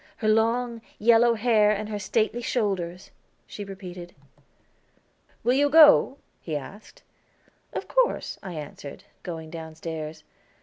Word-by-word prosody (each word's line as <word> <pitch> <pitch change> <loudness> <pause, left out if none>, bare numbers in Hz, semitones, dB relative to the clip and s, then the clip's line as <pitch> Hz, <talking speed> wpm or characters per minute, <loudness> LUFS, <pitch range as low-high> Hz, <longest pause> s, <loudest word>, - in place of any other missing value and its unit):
"Her 220 - -2
long, 230 +2 +1 0.2
yellow 235 +1 +4
hair 215 -2 +3
and 210 0 -1
her 210 -1 -4
stately 220 +4 0
shoulders," 195 -7 -2 0.3
she 205 - -8
repeated. 185 -3 -9 1.3
"Will 245 +2 +3
you 285 +2 +3
go?" 295 -3 +7 0.2
he 155 -3 -3
asked. 205 - -12 0.7
"Of - - -5
course," - - 0
I 185 -2 -7
answered, 150 +2 -9 0.2
going 160 -3 -7
downstairs. 160 -1 -7
210 Hz, 120 wpm, -25 LUFS, 170-235 Hz, 1.3 s, go